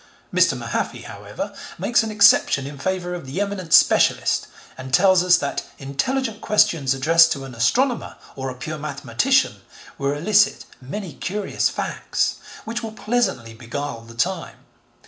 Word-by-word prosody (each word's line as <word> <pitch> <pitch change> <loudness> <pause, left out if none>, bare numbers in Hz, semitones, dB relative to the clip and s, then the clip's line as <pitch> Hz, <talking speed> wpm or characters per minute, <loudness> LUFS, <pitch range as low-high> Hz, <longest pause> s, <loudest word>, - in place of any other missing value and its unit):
Mr. - - +3
Mahaffy, - - -3
however, - - -7 0.2
makes 240 - +2
an 225 - -3
exception 205 -9 +4
in 140 0 -8
favour 180 +2 -2
of 175 -6 -7
the 140 +8 -4
eminent 200 -4 -3
specialist - - +4 0.3
and 130 0 -9
tells 185 -1 +4
us 180 -1 +5
that 140 - -3 0.2
intelligent 220 - -2
questions 150 -10 +2
addressed 165 +4 +5
to 135 - -3
an 130 - -10
astronomer, 235 - 0 0.2
or 135 -1 -4
a 130 - -7
pure 155 +5 -6
mathematician, 145 - 0 0.4
will 140 0 0
elicit 205 +8 +2 0.2
many 170 +7 -6
curious 200 +2 -2
facts - - -2 0.3
which 230 +1 -4
will 220 -2 -6
pleasantly 210 - -1
beguile 120 +2 -6
the 115 0 -14
time. 170 +5 -2
165 Hz, 145 wpm, -22 LUFS, 135-210 Hz, 0.4 s, us